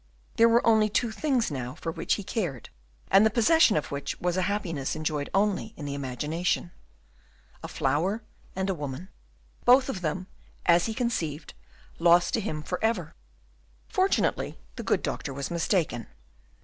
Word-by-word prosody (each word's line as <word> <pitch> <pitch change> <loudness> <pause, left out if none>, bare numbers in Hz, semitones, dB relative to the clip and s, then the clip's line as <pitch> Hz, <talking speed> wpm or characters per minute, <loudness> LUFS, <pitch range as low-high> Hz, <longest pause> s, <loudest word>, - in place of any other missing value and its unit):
There 230 0 +6
were 235 +1 +3
only 220 -2 +4
two 230 +2 0
things 250 - 0
now 125 -3 -4
for 165 - -4
which - - 0
he 205 - -6
cared, 175 - -3 0.4
and 195 +2 +7
the 220 - +5
possession 240 - +4
of 150 - -3
which 140 0 -4
was 180 0 0
a 185 - +1
happiness 165 -9 -2
enjoyed 155 -2 -2
only 205 +2 0
in 145 - -6
imagination. 150 +7 -2 0.9
A - - -6
flower, 175 +11 0 0.3
and 190 +1 -1
a 195 - +1
woman; 145 +2 -6 0.5
both 255 +2 +5
of 195 -9 -3
them, 175 +3 -2 0.4
as 170 +2 +4
he 220 - -3
conceived, 165 - -2 0.5
lost 175 +1 +5
to 225 - +1
him 155 -7 -4
for 180 +6 -4
ever. 180 -8 0 0.8
Fortunately 380 +1 +1 0.2
the - - -5
good - - 0
doctor 140 - -3
was 140 +3 -4
mistaken. 165 - 0
180 Hz, 160 wpm, -27 LUFS, 150-220 Hz, 0.9 s, and